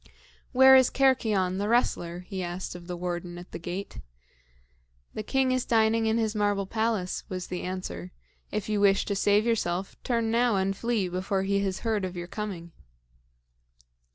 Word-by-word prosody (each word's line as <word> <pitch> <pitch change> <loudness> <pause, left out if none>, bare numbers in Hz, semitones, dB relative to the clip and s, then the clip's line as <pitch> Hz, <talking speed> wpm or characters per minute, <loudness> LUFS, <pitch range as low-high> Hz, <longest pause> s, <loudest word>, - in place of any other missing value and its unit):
"Where 265 +1 +8
is 260 -1 +6
Cercyon, 215 -9 +2
the 205 +1 -1
wrestler?" 175 -7 +1
he 190 +1 -6
asked 175 +1 -4
of 175 -1 -10
the 180 -1 -4
warden 175 0 -4
at 175 +1 -11
the - - -6
gate. 180 +4 -6 1.1
"The - - -4
king 260 +4 +1
is 255 -1 +1
dining 225 0 +2
in 220 +1 +2
his 220 -2 0
marble 205 -2 +1
palace," 220 -3 -1
was 185 -1 -4
the 180 - -3
answer. 185 0 -5 0.4
"If 210 -1 -3
you 210 -1 0
wish 195 -1 +4
to 200 - -2
save 205 +2 +3
yourself, 195 -5 -1
turn 230 -2 0
now 235 -1 +3
and 195 0 0
flee 230 -3 0
before 185 +2 -1
he 200 +1 +1
has 190 -1 -2
heard 220 -3 0
of 180 -1 -4
your 175 - -4
coming." 180 -3 -6
200 Hz, 175 wpm, -27 LUFS, 180-225 Hz, 1.1 s, Where